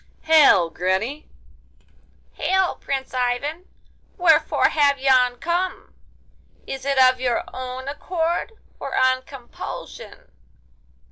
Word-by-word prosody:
'Hail, 290 - +5
granny!' 190 - -2 1.0
'Hail, 380 -1 0
Prince 270 -1 -4
Ivan! 260 +8 -2 0.5
wherefore 340 -3 +3
have 285 -2 +2
you 270 0 +1 0.3
come? 355 +2 -3 0.7
Is 270 0 -7
it 280 -1 0
of 255 -1 +4
your 245 -2 0
own 255 +1 -6
accord, 335 +7 -2 0.3
or - - -4
on 260 0 +3
compulsion? 260 -2 -10
275 Hz, 95 wpm, -22 LUFS, 255-320 Hz, 1.0 s, Hail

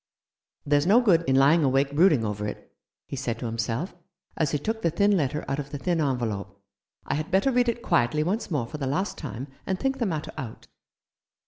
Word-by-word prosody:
"There's 145 +2 +2
no 215 +5 +7
good 195 -9 +4
in 130 - +3
lying 145 +5 +5
awake 135 +1 +2
brooding 155 -8 +4
over 105 0 -3
it," 105 - -8 0.3
he - - -6
said 125 -4 -3
to 120 - -6
himself, 115 - -2 0.4
as 155 -3 +1
he 150 - 0
took 220 +10 -3
the 170 - +2
thin 200 +5 +3
letter 150 -3 -1
out 140 - -2
of 145 -1 -5
the 145 - -5
thin 170 +2 0
envelope; 110 -8 -2 0.2
" - - -43
I - - -1
had 155 +4 -2
better 195 +8 +3
read 245 -1 +3
it 235 +1 -3
quietly 150 - +2
once 200 +8 -2
more 145 -9 0
for 150 +6 -8
the 135 - -2
last 190 +10 -1
time, 135 -3 -6 0.2
and 190 -1 -1
think 270 0 -1
the 235 - +1
matter 155 -4 -3
out." 120 -5 -7
150 Hz, 220 wpm, -26 LUFS, 130-185 Hz, 0.4 s, no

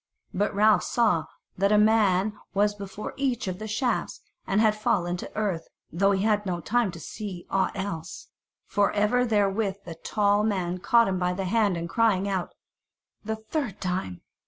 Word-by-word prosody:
But 205 +2 0
Ralph 210 -2 +5
saw 210 -10 +1 0.3
that 200 +1 +3
a 210 - +5
man 210 -2 +3 0.2
was 205 +1 +3
before 200 0 -7
each 255 -5 -1
of 185 0 -4
the 215 - -5
shafts, 240 +4 -1 0.3
and 195 - +2
had 215 -1 +4
fallen 180 -4 0
to - - -8
earth, 195 -6 -1 0.2
though 195 +5 +2
he 195 -1 +1
had 210 -1 +2
no 180 -3 -2
time 230 +5 +1
to 165 - -8
see 185 +2 -7
aught 195 -1 +1
else, 180 -4 -5 0.4
for 205 -1 +1
even 230 +4 +2
therewith 205 -2 +1
the 170 - -6
tall 205 +4 +1
man 185 -4 -1
caught 235 +4 +4
him 190 -1 -1
by 180 0 0
the 190 +1 -3
hand, 205 -2 +2
and 170 0 -4
crying 200 0 +2
out, 190 -3 -3 0.7
"The 220 +1 -2
third 220 - -4
time!" 180 - -3
200 Hz, 180 wpm, -26 LUFS, 185-215 Hz, 0.7 s, Ralph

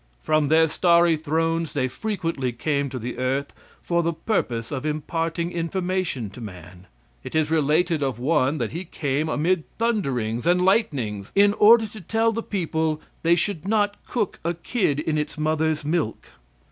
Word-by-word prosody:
From 155 -1 +2
their 160 +2 +5
starry 170 0 +4
thrones 165 +1 -1
they 130 -3 0
frequently 165 - -2
came 140 +3 -1
to 130 - -5
the 120 +1 -5
earth 135 +2 -1 0.3
for 170 0 +1
the 170 0 0
purpose 120 - -2
of 130 -2 -3
imparting 165 +3 -2
information 175 - -2
to 125 - -11
man. 90 -3 -10 0.4
It - - -7
is 155 -1 +1
related 160 +1 +2
of 135 -4 -1
one 140 +2 +1
that 120 -5 -2
he 170 +3 -4
came 150 -2 -2
amid 165 +3 +1
thunderings 135 - -1
and 180 +1 +3
lightnings 135 - 0
in 200 +1 +5
order 220 +2 +6
to 215 0 -10
tell 225 +6 +1
the 230 +1 -2
people 160 -6 -1 0.2
they 170 +1 +4
should 175 -1 -2
not 205 -1 +2
cook 230 -6 -2
a 170 +1 -1
kid 170 - 0
in 155 0 0
its 150 - -4
mother's 155 0 0
milk. 155 -7 -1
160 Hz, 165 wpm, -24 LUFS, 140-180 Hz, 0.4 s, order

